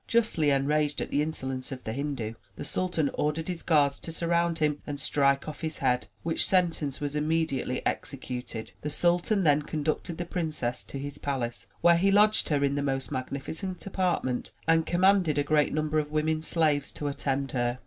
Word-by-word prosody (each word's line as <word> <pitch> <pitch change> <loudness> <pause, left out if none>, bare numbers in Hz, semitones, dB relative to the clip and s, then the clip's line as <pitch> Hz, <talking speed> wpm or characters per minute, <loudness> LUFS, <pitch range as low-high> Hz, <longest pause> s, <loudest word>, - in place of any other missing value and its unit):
Justly 215 -10 +2
enraged 145 +1 +1
at - - -4
the 145 - +2
insolence 135 -4 -3
of 130 -1 -6
the 110 - -4
Hindu, 135 -5 -3 0.2
the - - -6
sultan 175 -6 0
ordered 150 +2 -1
his 180 -2 -3
guards 145 -4 +3
to 165 - -7
surround 170 0 +1
him 150 -2 0
and 145 -1 -4
strike 140 0 +2
off 150 -2 -7
his 160 -1 -3
head, 125 -2 +1 0.2
which 165 0 +2
sentence 170 -7 +2
was 145 0 -3
immediately 150 -4 0
executed. 125 -4 -4
The 150 - -3
sultan 175 +6 +2
then 150 -2 +4
conducted 155 +3 -2
the 175 - -3
princess 155 -8 -2
to - - -7
his 145 +1 -6
palace, 130 -4 -3
where 170 -1 +6
he 195 +3 +3
lodged 210 +2 +4
her 145 -2 +2
in 140 0 +2
the 145 - 0
most 135 -1 -2
magnificent 145 +8 -4
apartment 180 -10 -1
and 165 0 +3
commanded 180 -3 +3
a 145 - +3
great 150 0 +2
number 155 0 +1
of 150 -1 -2
women 155 +1 0
slaves 155 -3 +1
to 145 - -4
attend 140 -1 -1
her. 120 0 -1
150 Hz, 185 wpm, -28 LUFS, 140-165 Hz, 0.2 s, where